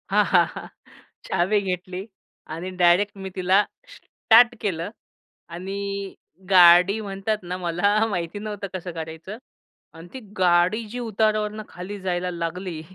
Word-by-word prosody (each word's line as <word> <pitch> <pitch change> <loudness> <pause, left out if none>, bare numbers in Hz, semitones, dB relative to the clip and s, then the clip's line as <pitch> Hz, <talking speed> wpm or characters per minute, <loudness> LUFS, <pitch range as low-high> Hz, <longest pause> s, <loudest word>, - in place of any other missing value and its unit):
हां. - - +4
हां. - - +4
हां. - - -7 0.6
चावी 190 +3 +1
घेतली 185 0 -4 0.5
आणि 170 +3 -5
डायरेक्ट 180 +4 +3
मी 190 0 -6
तिला 190 +2 +3 0.3
स्टार्ट 240 - +4
केलं. 175 -4 -2 0.6
आणि 195 +2 -5 0.4
गाडी 180 +2 +7
म्हणतात 200 +1 -2
ना 180 +1 -4
मला 185 +5 +1
माहिती 175 0 -3
नव्हतं 205 -1 -5
कसं 180 -1 -5
करायचं 160 +5 -7 0.6
आणि 165 +1 -12
ती 265 - -6 0.2
गाडी 180 +4 +3
जी 245 +3 -6
उतारावरनं 215 -1 -1
खाली 195 +3 -8
जायला 180 -1 -2
लागली. 170 0 -5
190 Hz, 130 wpm, -23 LUFS, 175-205 Hz, 0.6 s, गाडी